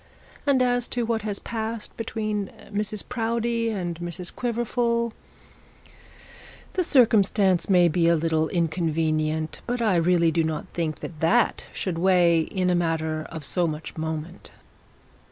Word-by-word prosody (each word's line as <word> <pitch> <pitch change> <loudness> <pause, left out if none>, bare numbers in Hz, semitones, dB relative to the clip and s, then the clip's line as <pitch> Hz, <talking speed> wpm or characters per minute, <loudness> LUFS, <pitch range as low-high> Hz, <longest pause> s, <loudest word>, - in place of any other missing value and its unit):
And 265 -3 +4
as 245 -1 +1
to 240 -1 -1
what 225 -1 0
has 205 -1 -2
passed 225 0 -5
between 215 -3 -3 0.2
Mrs 210 0 -2
Proudie 230 -1 -1
and 175 -6 -3
Mrs 175 +1 -4
Quiverful, 235 -1 0 1.6
the 370 - +1
circumstance 205 - +3
may 180 -2 +6
be 165 +1 +2
a 170 - +5
little 160 0 +1
inconvenient, 160 -2 -1
but 245 +1 -1
I 215 -6 +2
really 170 -1 +3
do 165 0 +1
not 160 -1 -2
think 160 -3 -3
that 155 - -7
that 215 +9 +2
should 175 -4 -3
weigh 175 -2 +4
in 180 +2 -1
a - - +2
matter 160 -2 -1
of 160 -3 -6
so 175 +2 +1
much 155 0 -6
moment.' 160 +2 -5
180 Hz, 140 wpm, -25 LUFS, 165-225 Hz, 1.6 s, may